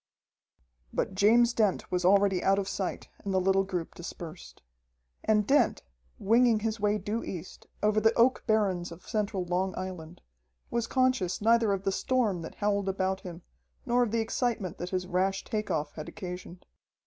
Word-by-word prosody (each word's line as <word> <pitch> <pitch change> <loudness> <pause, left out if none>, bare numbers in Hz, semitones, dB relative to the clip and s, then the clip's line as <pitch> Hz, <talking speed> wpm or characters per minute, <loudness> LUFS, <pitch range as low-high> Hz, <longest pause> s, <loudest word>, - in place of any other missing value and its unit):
But - - -1
James 230 +5 +4
Dent 210 -5 0
was 180 0 0
already 195 0 +4
out 195 +1 +4
of 195 -1 -1
sight, 195 -1 -3 0.2
and 200 - -3
the 190 - +2
little 195 +1 +3
group 180 -4 -4
dispersed. 170 - -9 0.6
And 210 -1 +3
Dent, 285 +6 +2 0.3
winging 230 +1 +3
his 220 0 -2
way 210 +1 +2
due 210 +3 -3
east, 175 -1 -8 0.2
over 215 0 +3
the 225 +1 +5
oak 245 +2 +3
barrens 195 -6 +1
of 170 +2 -12
central 205 -3 -1
Long 180 +2 -1
Island, 180 -3 -7 0.5
was 235 -1 -1
conscious 255 -9 +1
neither 225 0 +3
of 195 -1 -1
the 195 - +1
storm 215 -4 0
that 165 - -8
howled 200 -1 0
about 190 0 -1
him 175 -2 -9 0.4
nor 245 -1 +2
of 240 - +2
the 230 +1 0
excitement 225 -5 -2
that 175 - -4
his 185 -1 -2
rash 190 +2 0
take 215 -1 -3
off 150 - -2
had 155 - -7
occasioned. 180 -2 -8
195 Hz, 170 wpm, -29 LUFS, 185-220 Hz, 0.6 s, the